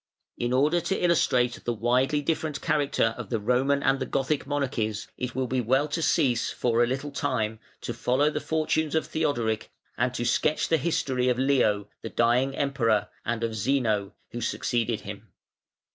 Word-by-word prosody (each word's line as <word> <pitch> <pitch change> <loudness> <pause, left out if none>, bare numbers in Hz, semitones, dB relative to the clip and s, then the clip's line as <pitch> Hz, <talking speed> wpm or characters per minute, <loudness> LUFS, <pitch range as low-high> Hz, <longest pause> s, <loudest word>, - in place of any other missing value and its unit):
In 120 0 -2
order 150 +7 +3
to 170 +3 -1
illustrate 125 -8 +2
the 120 - -1
widely 130 +6 +1
different 155 -1 -1
character 145 -7 +1
of - - -6
the 115 - 0
Roman 130 +6 +1
and 135 0 +2
the 130 - -3
Gothic 140 +1 -1
monarchies 130 -7 -2
it 125 -1 -5
will 130 0 0
be 125 0 0
well 130 +5 +2
to 165 +3 -2
cease 120 -6 +2
for 120 -1 +1
a - - +2
little 135 +3 -3
time 125 -7 -1 0.2
to - - -4
follow 140 +5 +1
the 150 - -3
fortunes 155 -1 0
of 160 - +1
Theodoric 120 -9 -1 0.3
and 125 +1 +2
to 120 - -2
sketch 150 +5 +1
the 165 - +4
history 130 -5 0
of 125 - +1
Leo, 125 -7 +2
the - - -5
dying 125 +3 +2
Emperor, 130 -7 +1
and 115 0 -2
of 115 -1 -1
Zeno, 110 -3 0 0.2
who 120 - -5
succeeded 115 0 -1
him. 105 +1 -8
130 Hz, 175 wpm, -26 LUFS, 115-145 Hz, 0.3 s, the